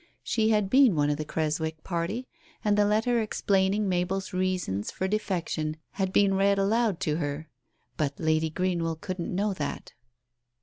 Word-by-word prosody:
She 220 -1 +1
had 210 -2 +2
been 255 -3 +5
one 145 -1 +2
of 145 - -1
the 155 - -4
Creswick 160 0 -2
party, 190 +8 -3 0.4
and 205 -1 +3
the 205 0 +4
letter 230 +3 +2
explaining 200 -1 +1
Mabel's 185 +1 -1
reasons 185 - -1
for 190 - -2
defection 170 -6 -2
had 190 -2 -2
been 195 0 +4
read 195 +1 +3
aloud 205 -1 +1
to 150 0 0
her. 150 0 -4 0.5
But 140 -2 -1
Lady 160 0 +1
Greenwell 170 -1 -1
couldn't 180 +1 -4
know 200 +2 +1
that. 145 -6 -5
185 Hz, 160 wpm, -27 LUFS, 160-205 Hz, 0.5 s, been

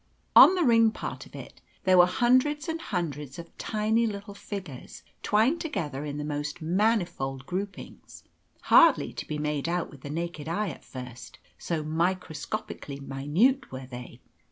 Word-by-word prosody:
On 375 - +10
the 360 - +2
ring 230 -4 +5
part - - -6
of - - -15
it - - -10 0.2
there 185 0 +4
were 175 - +8
hundreds 255 - +2
and 325 0 -3
hundreds 150 - -4
of 170 0 -10
tiny 220 +2 +1
little 200 -1 -6
figures 190 -9 -8 0.2
twined 230 +10 +2
together 150 - -3
in 145 -1 -4
the 150 - -3
most 150 +2 -4
manifold 170 - 0
groupings, 190 +2 -7 0.4
hardly - - +5
to - - -6
be 150 - -3
made 150 +1 -2
out 175 0 -1
with 140 - -14
the 140 - -8
naked 165 -1 -4
eye 205 +4 -1
at 145 - -9
first, 125 -1 -10 0.2
so 165 -3 -2
microscopically 160 -1 -3
minute 145 - +1
were 130 0 -7
they. 125 -1 -10
170 Hz, 155 wpm, -27 LUFS, 145-215 Hz, 0.4 s, On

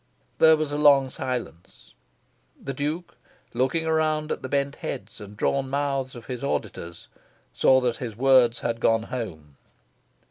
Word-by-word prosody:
There 160 0 +7
was 155 -1 -2
a 145 - -2
long 140 -3 +5
silence. 125 - -6 0.7
The 135 - -5
Duke, 150 +6 -4 0.4
looking 130 +7 0
around 155 -1 0
at - - -3
the 130 - -6
bent 140 +1 -1
heads 110 +2 -7
and 105 0 -11
drawn 135 +3 0
mouths 135 -2 -2
of 120 - -10
his 125 -1 -6
auditors, 85 -10 -4 0.5
saw 130 - +4
that 120 -2 0
his 115 -4 -6
words 130 -2 +4
had 115 -1 -2
gone 115 -1 +2
home. 80 - -7
130 Hz, 150 wpm, -25 LUFS, 115-145 Hz, 0.7 s, There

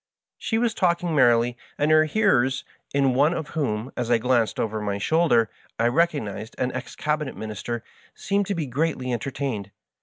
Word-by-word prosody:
She 225 - -1
was 230 -1 +1
talking 175 -3 +1
merrily, 120 -3 +4 0.2
and 150 +2 +2
her 155 0 +6
hearers, 135 - +2 0.3
in 135 -2 +2
one 145 +6 +3
of 155 -2 -4
whom, 130 -5 -2
as 120 -1 -2
I 120 - +5
glanced 120 -1 +1
over 110 -1 -1
my 100 -1 -2
shoulder, 120 -1 +3 0.3
I 115 - +3
recognized 120 - -1
an 125 0 0
ex - - -6
Cabinet 150 -2 -2
Minister, 110 +2 -5 0.3
seemed 200 -1 0
to 200 - -1
be 165 -3 -2
greatly 130 -1 -1
entertained. 120 -4 -3
130 Hz, 170 wpm, -24 LUFS, 115-160 Hz, 0.3 s, her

